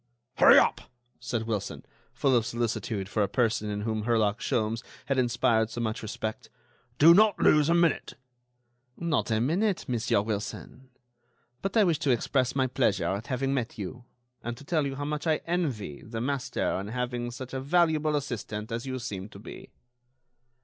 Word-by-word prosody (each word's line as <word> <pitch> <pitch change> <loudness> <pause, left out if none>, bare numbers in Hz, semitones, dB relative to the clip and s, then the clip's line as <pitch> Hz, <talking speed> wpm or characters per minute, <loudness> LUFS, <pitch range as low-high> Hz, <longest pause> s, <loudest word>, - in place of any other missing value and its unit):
"Hurry - - +8
up!" - - +4 0.4
said 120 -2 -2
Wilson, 105 -3 -4 0.3
full 135 -2 +2
of 120 - +3
solicitude 110 -4 -2
for 105 +2 -1
a 100 - +2
person 110 -1 0
in 105 0 -3
whom 110 0 -2
Herlock 110 -2 +2
Sholmes 115 0 -1 0.2
had 135 -2 0
inspired 120 -2 +2
so 120 - -6
much 110 -1 -2
respect, 110 0 -5 0.5
"do 165 +3 +8
not 210 +2 +5
lose 150 0 +4
a 170 - +4
minute." 170 -3 +1 0.8
"Not 170 -6 0
a 110 -1 +2
minute, 180 - 0
Monsieur 115 -4 +1
Wilson; 110 +4 -5 0.7
but 195 +3 -1
I 215 - +7
wish 170 -5 +2
to 145 - -1
express 130 +1 +1
my 135 -1 +2
pleasure 120 -6 +1
at 100 +3 -3
having 135 +1 -1
met 125 -4 -2
you, 120 +5 -7 0.4
and 120 0 -5
to 145 - -12
tell 150 -1 0
you 135 - -4
how 145 +1 -4
much 150 +2 -3
I 155 -1 +2
envy 135 - -2
the 115 0 -6
master 135 -4 -1
in 100 - -5
having 120 +1 -3
such 130 +1 -8
a 130 - -2
valuable 155 0 +2
assistant 110 -5 -4
as 115 +3 -4
you 130 0 -3
seem 105 -6 -6
to - - -12
be." - - -10
120 Hz, 175 wpm, -28 LUFS, 110-145 Hz, 0.8 s, Hurry